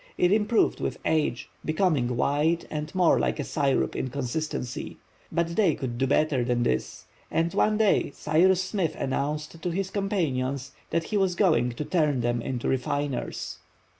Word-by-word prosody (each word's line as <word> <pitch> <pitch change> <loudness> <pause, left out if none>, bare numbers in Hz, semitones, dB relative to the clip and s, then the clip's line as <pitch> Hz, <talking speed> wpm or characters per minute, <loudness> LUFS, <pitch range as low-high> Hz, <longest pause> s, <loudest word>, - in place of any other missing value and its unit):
It 180 - +3
improved 215 +2 +2
with - - -2
age, 155 -6 0 0.2
becoming 155 -8 +1
whiter 155 +6 +1
and 150 +2 -4
more 180 -3 +4
like - - 0
a - - 0
syrup 140 -1 0
in 130 - -2
consistency. 125 -1 -4 0.3
But 170 0 0
they 215 -3 +3
could 120 -4 -4
do 135 - +2
better 145 -2 +2
than 120 0 +1
this, 65 - -2 0.2
and 165 +1 0
one 215 0 +2
day 215 -2 +3
Cyrus 180 +5 +3
Smith 190 -4 -1
announced 150 +4 -3
to 180 - -1
his 190 +2 -2
companions 140 -10 -1 0.2
that 165 0 0
he 210 - -2
was 190 -3 +2
going 160 - +3
to 150 +5 -4
turn 150 -7 +1
them 120 0 0
into 125 0 -3
refiners. 135 +1 -2
155 Hz, 165 wpm, -26 LUFS, 130-180 Hz, 0.3 s, more